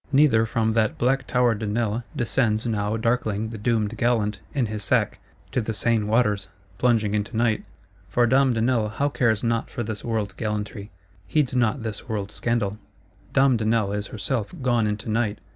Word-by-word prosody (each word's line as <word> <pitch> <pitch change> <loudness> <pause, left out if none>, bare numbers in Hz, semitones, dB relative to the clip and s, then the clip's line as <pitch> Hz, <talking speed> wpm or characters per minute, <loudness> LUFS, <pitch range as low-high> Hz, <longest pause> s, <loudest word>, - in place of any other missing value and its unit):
Neither 135 -6 +4
from 110 0 +1
that 110 -1 +1
black 130 +1 +1
Tower 125 -2 +3
de 110 0 -4
Nesle 110 +1 0
descends 115 -2 +1
now 105 -1 0
darkling 110 -2 0
the 115 - -6
doomed 110 0 0
gallant, 110 -4 +1
in 135 -4 0
his 105 -1 -4
sack, 95 - +1 0.3
to 125 - +1
the 110 0 -3
Seine 115 0 +1
waters; 105 -3 +1 0.3
plunging 115 -4 +2
into 105 +2 -2
Night: 115 -2 +1 0.4
for 120 +5 +3
Dame 130 +1 +4
de 115 - 0
Nesle 115 -3 +1
now 145 +1 +2
cares 115 -6 +1
not 115 -1 0
for 120 - -4
this 110 -1 -5
world's 110 -4 -2
gallantry, 105 +1 -4 0.4
heeds 150 -5 +1
not 120 0 +1
this 110 +2 -6
world's 100 -2 -3
scandal; 105 -4 -1 0.5
Dame 135 -2 +4
de 110 - -2
Nesle 110 -3 +1
is 105 0 -2
herself 110 0 -2
gone 120 -3 +2
into 105 +1 -3
Night. 110 -1 0
110 Hz, 180 wpm, -24 LUFS, 105-120 Hz, 0.5 s, Neither